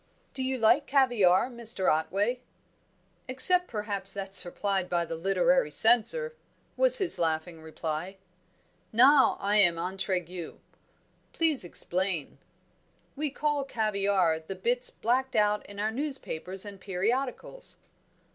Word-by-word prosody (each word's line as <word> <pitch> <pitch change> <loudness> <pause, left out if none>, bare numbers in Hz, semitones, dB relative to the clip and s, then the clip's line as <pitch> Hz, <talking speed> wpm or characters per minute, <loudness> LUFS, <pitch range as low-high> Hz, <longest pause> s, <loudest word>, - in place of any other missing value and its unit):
"Do 265 - -6
you 260 0 -2
like 250 +5 +3
caviare, 240 -8 +3
Mr. 235 -6 -3
Otway?" 200 +10 0 0.9
"Except 360 +8 +4
perhaps 200 -3 -4
that 195 -1 -6
supplied 190 0 +1
by 175 -1 0
the 165 - -6
literary 195 - +1
censor," 245 - +3 0.4
was - - +8
his 380 -4 +1
laughing 160 0 -2
reply. 160 +3 -6 0.7
"Now 265 +5 +5
I 205 +1 0
am 175 -5 +4
intriguee. 180 -1 -5 0.8
Please 320 - +1
explain." 175 -2 -2 0.8
"We 300 +1 -1
call 295 +1 -2
caviare 200 -8 0
the 160 +4 -8
bits 245 +6 -2
blacked 260 +3 -2
out 210 0 +1
in 200 - -12
our 215 +1 -1
newspapers 220 - -5
and 200 -2 -10
periodicals." 245 - -3
205 Hz, 120 wpm, -27 LUFS, 180-260 Hz, 0.9 s, was